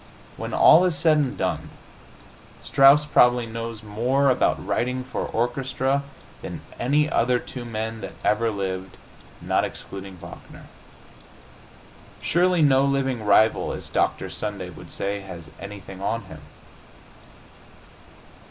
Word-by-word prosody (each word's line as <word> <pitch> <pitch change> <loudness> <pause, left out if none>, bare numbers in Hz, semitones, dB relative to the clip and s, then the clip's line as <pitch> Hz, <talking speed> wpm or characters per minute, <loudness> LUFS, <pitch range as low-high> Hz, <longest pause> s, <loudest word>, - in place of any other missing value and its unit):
When - - -6
all 170 - +7
is 175 -3 0
said 160 -3 +4
and 140 -4 -1
done, - - -2 0.9
Strauss 140 +1 +6
probably 125 -4 +4
knows 115 -1 -6
more 125 +6 +1
about 125 - +1
writing 125 +1 -1
for 130 - -4
orchestra 130 +3 -1 0.4
than - - -7 0.2
any 145 +5 +2
other 125 -3 +2
two 125 0 -8
men 110 -1 -4
that - - -7
ever 110 +2 +2
lived, 95 -2 -4 0.4
not - - +1
excluding 95 -1 -7
Wagner. - - -12 1.5
Surely 175 0 +2
no 135 -2 +5
living 135 -4 0
rival, 110 +2 +3
as - - -7
Dr. - - -1
Sunday 100 -4 -5
would - - -12
say, 100 +1 -2
has 85 -5 -10
anything 100 -1 -9
on 115 +3 -2
him. 80 -5 -11
120 Hz, 125 wpm, -24 LUFS, 105-135 Hz, 1.5 s, all